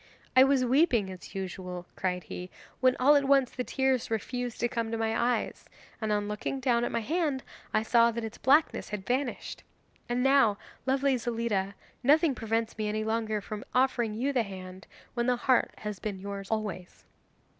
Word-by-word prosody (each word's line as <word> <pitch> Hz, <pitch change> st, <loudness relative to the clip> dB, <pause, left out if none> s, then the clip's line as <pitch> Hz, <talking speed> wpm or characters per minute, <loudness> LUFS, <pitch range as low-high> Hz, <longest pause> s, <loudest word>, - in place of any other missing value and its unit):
'I 260 Hz, +1 st, +9 dB
was 270 Hz, -2 st, +3 dB
weeping 245 Hz, -, +3 dB
as 185 Hz, +2 st, -11 dB
usual,' 180 Hz, -2 st, -5 dB
cried 180 Hz, -1 st, -2 dB
he, 180 Hz, +4 st, -7 dB, 0.3 s
'when 255 Hz, -1 st, +4 dB
all 285 Hz, +4 st, +6 dB
at 285 Hz, -1 st, +3 dB
once 270 Hz, -2 st, +4 dB
the 250 Hz, -, -3 dB
tears 265 Hz, -1 st, 0 dB
refused 245 Hz, +2 st, -3 dB
to 240 Hz, -, +2 dB
come 230 Hz, -2 st, -2 dB
to 225 Hz, -, -2 dB
my 225 Hz, 0 st, 0 dB
eyes, 240 Hz, 0 st, 0 dB, 0.4 s
and 220 Hz, -1 st, -1 dB
on 205 Hz, 0 st, 0 dB
looking 210 Hz, +6 st, -3 dB
down 245 Hz, -3 st, +2 dB
at -, -, -1 dB
my 230 Hz, -, 0 dB
hand 295 Hz, 0 st, -1 dB, 0.3 s
I 215 Hz, -, +2 dB
saw 235 Hz, +1 st, +5 dB
that 235 Hz, 0 st, -3 dB
its 220 Hz, 0 st, -6 dB
blackness 295 Hz, +4 st, +3 dB
had 210 Hz, -2 st, -5 dB
vanished. 255 Hz, +1 st, -2 dB, 0.5 s
And 245 Hz, +1 st, +1 dB
now, 270 Hz, -7 st, +4 dB, 0.3 s
lovely 270 Hz, 0 st, +2 dB
Zelida, 225 Hz, -5 st, -1 dB, 0.3 s
nothing 295 Hz, +3 st, +4 dB
prevents 225 Hz, -1 st, -2 dB
me 210 Hz, -1 st, 0 dB
any 215 Hz, +1 st, -1 dB
longer 220 Hz, -1 st, -1 dB
from 210 Hz, +1 st, -6 dB
offering 245 Hz, -4 st, +2 dB
you 270 Hz, +5 st, 0 dB
the 250 Hz, -, +3 dB
hand, 185 Hz, -2 st, -8 dB, 0.3 s
when 240 Hz, 0 st, -1 dB
the 250 Hz, -, +3 dB
heart 250 Hz, +1 st, +2 dB
has 210 Hz, -3 st, -5 dB
been 200 Hz, -1 st, -4 dB
yours 200 Hz, 0 st, -6 dB
always. 210 Hz, -5 st, -4 dB
230 Hz, 185 wpm, -29 LUFS, 210-255 Hz, 0.5 s, I